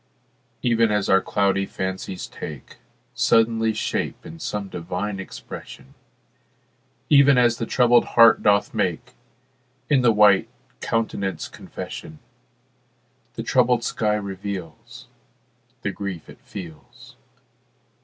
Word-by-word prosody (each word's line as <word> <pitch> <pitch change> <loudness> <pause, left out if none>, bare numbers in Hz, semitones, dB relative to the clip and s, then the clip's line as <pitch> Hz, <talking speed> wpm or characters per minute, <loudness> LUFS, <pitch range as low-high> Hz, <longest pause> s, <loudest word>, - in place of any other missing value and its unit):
Even 115 -2 +3
as 105 -2 0
our 95 0 +5
cloudy 100 0 0
fancies 95 -1 -5
take 75 -4 -9 0.4
Suddenly 115 0 +2
shape - - -3
in 80 +1 -10
some 105 +3 -4
divine 95 +3 -4
expression, 95 - -10 1.1
Even 140 -2 +6
as 120 -1 +3
the 115 - -3
troubled 120 -1 +4
heart 115 -1 +7
doth 100 -1 +2
make 105 +2 -2 0.8
In 140 -3 +5
the 120 -2 +5
white 105 -3 +4 0.3
countenance 105 -4 -2
confession, 80 - -9 1.2
The - - -4
troubled 120 -1 +2
sky 105 -2 0
reveals 100 -3 -7 0.8
The - - -1
grief 95 -5 -6
it - - -17
feels. 85 -6 -11
105 Hz, 105 wpm, -23 LUFS, 95-115 Hz, 1.2 s, heart